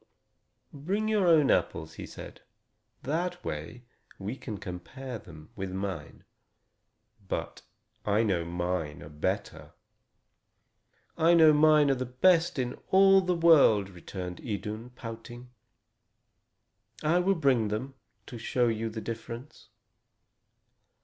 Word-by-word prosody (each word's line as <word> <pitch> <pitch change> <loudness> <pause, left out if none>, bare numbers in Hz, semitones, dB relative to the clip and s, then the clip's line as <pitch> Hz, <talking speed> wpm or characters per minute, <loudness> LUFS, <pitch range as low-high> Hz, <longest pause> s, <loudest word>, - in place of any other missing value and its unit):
"Bring 190 +10 -2
your 210 -4 +2
own 155 -4 +5
apples," 80 - 0
he - - -8
said, - - -11 0.6
"that 175 +5 -2
we 80 +12 -6 0.3
may 100 +5 -5
compare 110 +3 -7
them 80 0 -14
with 95 -3 -5
mine. 95 -5 -5 1.0
But - - -4 0.4
I 105 +2 +2
know 95 -6 +1
mine 85 -3 -3
are 75 - -10
better." 75 0 -4 1.5
"I 165 +2 +5
know 160 -2 +7
mine 150 -1 +5
are - - +4
the 130 -1 -3
best 165 +7 +3
in 125 -2 -3
all 195 0 +6
the 180 -1 0
world," 145 - +5
returned 90 0 -7
Idun, 110 +2 -5
pouting. 120 +1 -9 1.5
"I 165 +4 +3
will 195 +2 +2
bring 135 -9 +2
them, 110 +6 -4 0.3
to 120 - -9
show 120 +1 +1
you 115 0 -2
the 110 0 -6
difference." 115 +5 -8
120 Hz, 115 wpm, -29 LUFS, 100-155 Hz, 1.5 s, know